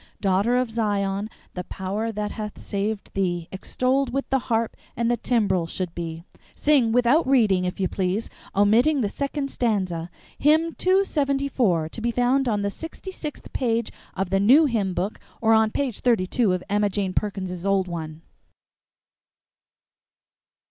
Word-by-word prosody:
'Daughter 200 +5 +2
of 250 -2 0
Zion, 205 -2 -1 0.2
the 180 - -4
power 205 +4 -3
that 210 -1 -3
hath 210 -1 -6
saved 205 +1 -3
thee 175 -3 -1
Extolled 255 +7 0
with 275 +2 -2
the 270 - +3
harp 225 -1 +1 0.2
and 235 +1 +1
the - - +3
timbrel 205 -9 +1
should 175 0 -4
be.' 165 -1 -5 0.3
"Sing 275 -6 +3
without 250 +6 +3
reading, 215 -9 +3
if 180 - -3
you 190 - +2
please, 190 +4 -1 0.3
omitting 235 +9 +4
the 205 - 0
second 280 +3 -3
stanza. 185 -8 -1 0.3
Hymn 315 +3 +3
two 380 +2 +3
seventy 280 -4 0
four, 180 - +1
to 225 - -8
be 235 - 0
found 250 +3 +2
on 210 -3 0
the 200 - -1
sixty 325 - -8
sixth 305 -5 -8
page 230 -3 0 0.2
of 190 -1 -2
the 195 - +3
new 260 +11 +6
hymn 205 -9 0
book 200 +4 -2 0.2
or 225 -1 +4
on 220 0 +4
page 255 -1 -2
thirty 230 -7 +2
two 220 +1 +1
of 180 0 -1
Emma 205 0 +2
Jane 195 -2 -2
Perkins's 185 -4 -3
old 195 -1 +2
one." 160 -2 -6
215 Hz, 160 wpm, -24 LUFS, 190-250 Hz, 0.3 s, new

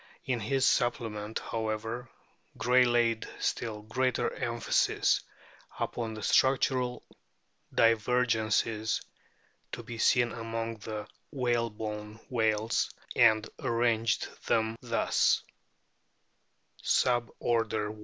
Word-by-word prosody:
In 130 -4 0
his 130 +5 +1
"Supplement," 110 -4 0
however, 115 +2 -3 0.5
Gray 125 +1 +4
laid 120 -2 +2
still 110 -3 -2
greater 125 +3 0
emphasis 120 -2 +1 0.6
upon 115 -2 -3
the 110 - -7
structural 130 -1 +2 0.7
divergences 115 -1 +2 0.7
to - - -5
be 115 -1 -8
seen 120 +1 +4
amono 115 0 -4
the 105 -1 -5 0.2
whalebone 110 -5 -2
whales, 110 -2 +1 0.3
o - - -5
o - - +8
and 110 -1 +4
arranged 115 -3 +1 0.2
them 110 0 +1
thus: 115 -2 +2 1.4
Sub 120 -1 +2
order 110 -3 0
I. 110 - -14
115 Hz, 95 wpm, -30 LUFS, 110-120 Hz, 1.4 s, o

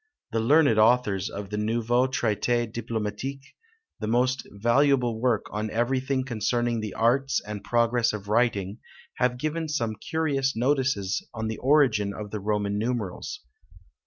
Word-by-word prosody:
The 115 - 0
learned 130 -1 +4
authors 110 -4 +3
of 100 0 -7
the 105 - -2
Nouveau 120 +3 +1
Traité 120 -1 0
Diplomatique, 115 +4 -5 0.5
the 110 - -3
most 125 +3 +1
valuable 120 +2 +2
work 120 -4 +1
on 105 +1 -3
everything 130 +4 0
concerning 120 0 0
the 110 -2 -5
arts 130 +4 +2
and 105 -1 -7
progress 120 +1 +2
of 100 -2 -7
writing, 105 -2 +1 0.4
have 125 -1 +1
given 155 +4 -2
some 120 -7 -1
curious 140 -1 -1
notices 125 -6 0
on 110 -1 -3
the 110 - -4
origin 125 -8 +3
of 105 -1 -7
the 105 - -3
Roman 105 0 -1
numerals. 110 -5 -3
115 Hz, 140 wpm, -26 LUFS, 105-130 Hz, 0.5 s, learned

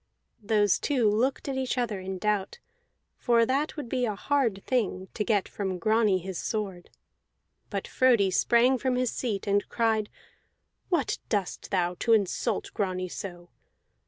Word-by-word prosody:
Those 205 -2 +2
two 255 -7 +1
looked 235 +8 +1
at 270 -1 -2
each 260 -1 -1
other 230 -5 -1
in 190 0 -5
doubt, 210 - -1 0.6
for 235 -2 +3
that 275 +6 -1
would 290 -5 -5
be 250 +1 0
a 210 - -2
hard 230 -4 0
thing, 195 -7 -1
to 210 - -1
get 205 -2 +1
from 190 -3 -3
Grani 215 +1 +3
his 185 0 -5
sword. 195 -6 -4 0.8
But - - -3
Frodi 235 -7 +3
sprang 245 +6 +3
from 260 -1 0
his 250 -1 0
seat, 215 -6 -3
and 205 0 +1
cried: 220 -2 +1 0.8
"What 335 -8 0
dost 200 -4 -2
thou 180 -3 +1
now, 180 - -9
to 230 - +3
insult 210 +1 0
Grani 185 -2 -2
so? 175 -1 -8
215 Hz, 160 wpm, -28 LUFS, 190-245 Hz, 0.8 s, for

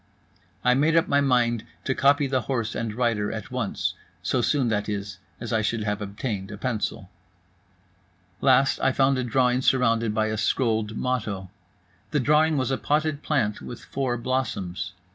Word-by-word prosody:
I 125 - +5
made 150 +5 +3
up 165 - +4
my 140 0 +3
mind 120 -4 +2 0.2
to 130 - 0
copy 140 +2 +3
the 130 -1 0
horse 115 -2 -2
and 115 -2 -2
rider 115 -4 0
at 110 +2 -6
once, 125 -5 -2 0.3
so 125 +6 +1
soon, 130 -1 +1
that 105 -1 -1
is, 100 -2 -4 0.2
as 120 0 -4
I 110 - +2
should 110 0 -1
have 105 0 -2
obtained 100 -1 -4
a 105 - -7
pencil. 105 -4 -3 1.3
Last, 135 +1 +4
I 130 - +3
found 135 0 +3
a - - 0
drawing 125 +1 +2
surrounded 115 -4 +2
by 110 0 +2
a 110 - -2
scrolled 110 -1 0
motto. 105 -7 -2 0.6
The 150 - +1
drawing 150 +3 +3
was 130 0 0
a 135 - 0
potted 150 0 0
plant 120 -11 0
with 120 - -9
four 130 -3 -1
blossoms. 115 -8 -2
120 Hz, 170 wpm, -25 LUFS, 110-135 Hz, 1.3 s, I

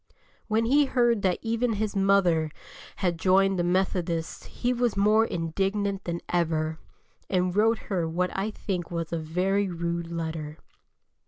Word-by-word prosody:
When 220 +1 +1
he 285 +5 +4
heard 240 -5 +2
that 185 -2 +1
even 230 +1 0
his 215 0 -2
mother 195 -5 +3 0.5
had 175 -4 -1
joined 190 +1 +3
the - - +2
Methodists 175 -2 -1
he 245 +1 -1
was 240 -3 0
more 215 +2 +4
indignant 195 +3 -2
than 170 0 -3
ever, 160 -2 0 0.5
and 180 -1 +1
wrote 225 +2 +4 0.2
her 170 -3 0
what 180 +2 -1
I 195 +3 -1
think 185 -5 -4
was 170 -1 -4
a 165 - 0
very 185 +5 0
rude 170 -1 -3
letter. 160 -2 -4
185 Hz, 150 wpm, -27 LUFS, 170-210 Hz, 0.5 s, he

